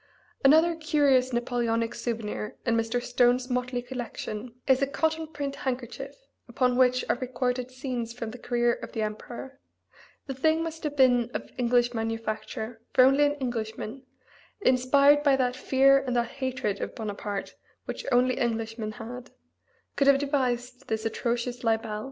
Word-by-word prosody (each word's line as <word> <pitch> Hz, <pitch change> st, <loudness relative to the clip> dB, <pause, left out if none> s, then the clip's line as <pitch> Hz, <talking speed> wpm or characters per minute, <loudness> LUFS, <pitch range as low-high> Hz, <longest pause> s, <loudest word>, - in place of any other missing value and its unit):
Another 320 Hz, +5 st, +6 dB
curious 285 Hz, -5 st, +2 dB
Napoleonic 240 Hz, -2 st, 0 dB
souvenir 220 Hz, -2 st, -4 dB
in 230 Hz, -2 st, +2 dB
Mr. 225 Hz, +1 st, 0 dB
Stone's 245 Hz, +1 st, +2 dB
motley 250 Hz, 0 st, -1 dB
collection 245 Hz, -2 st, -6 dB
is 265 Hz, 0 st, +3 dB
a 275 Hz, -, +2 dB
cotton 320 Hz, +3 st, -1 dB
print 285 Hz, -2 st, -5 dB
handkerchief, 250 Hz, -2 st, -4 dB, 0.3 s
upon 250 Hz, +1 st, +1 dB
which 255 Hz, 0 st, +3 dB
are -, -, +1 dB
recorded 250 Hz, 0 st, -2 dB
scenes 255 Hz, -3 st, -4 dB
from 230 Hz, -2 st, -6 dB
the 250 Hz, -, -10 dB
career 240 Hz, 0 st, +1 dB
of -, -, -8 dB
the 220 Hz, -3 st, -1 dB
emperor; 240 Hz, +5 st, -6 dB, 0.7 s
the 270 Hz, -, -4 dB
thing 315 Hz, +5 st, +2 dB
must 325 Hz, 0 st, -6 dB
have 295 Hz, -1 st, -2 dB
been 245 Hz, -3 st, +4 dB
of -, -, -5 dB
English 240 Hz, 0 st, +2 dB
manufacture, 225 Hz, 0 st, -4 dB
for 255 Hz, -, +7 dB
only 275 Hz, +3 st, +5 dB
an 290 Hz, 0 st, +1 dB
Englishman 235 Hz, -2 st, -4 dB, 0.6 s
(inspired 280 Hz, +1 st, +5 dB
by 285 Hz, -2 st, +4 dB
that 250 Hz, -1 st, 0 dB
fear 270 Hz, +1 st, +4 dB
and 255 Hz, -2 st, -3 dB
that 235 Hz, -1 st, +1 dB
hatred 260 Hz, -6 st, -3 dB
of -, -, -4 dB
Bonaparte 205 Hz, -2 st, -4 dB, 0.3 s
which -, -, -5 dB
only 250 Hz, 0 st, +3 dB
Englishmen 225 Hz, -2 st, -2 dB
had) 245 Hz, +2 st, -8 dB, 0.7 s
could 280 Hz, -, +2 dB
have 280 Hz, -1 st, +7 dB
devised 255 Hz, -3 st, -1 dB
this 220 Hz, 0 st, -2 dB
atrocious 240 Hz, +2 st, -2 dB
libel. 225 Hz, -2 st, 0 dB
250 Hz, 150 wpm, -27 LUFS, 230-270 Hz, 0.7 s, for